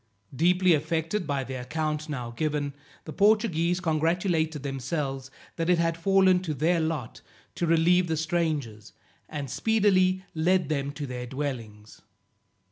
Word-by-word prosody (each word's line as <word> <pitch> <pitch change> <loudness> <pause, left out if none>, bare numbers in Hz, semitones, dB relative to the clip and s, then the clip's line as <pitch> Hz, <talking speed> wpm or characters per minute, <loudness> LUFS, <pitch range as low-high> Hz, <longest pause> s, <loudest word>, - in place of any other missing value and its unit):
Deeply 180 +4 +4
affected 165 +4 -1
by 140 -2 -1
the 130 - -7
account 150 +4 -3
now 125 -5 -4
given, 145 +2 -2 0.3
the 155 - -7
Portuguese 195 -5 +2
congratulated 160 -2 0
themselves 135 0 -3 0.3
that 165 0 -1
it 180 - +4
had 165 0 +1
fallen 190 +1 +4
to 165 -5 -4
their 165 +5 +2
lot 160 -7 -3 0.3
to 170 - -2
relieve 175 +2 +4
the 160 -1 -1
strangers, 155 - -2 0.4
and 145 -3 -4
speedily 190 - +2
led 170 0 +1
them 140 -2 -1
to 145 0 -5
their 125 -1 -6
dwellings. 120 -6 -6
160 Hz, 135 wpm, -27 LUFS, 140-175 Hz, 0.4 s, Deeply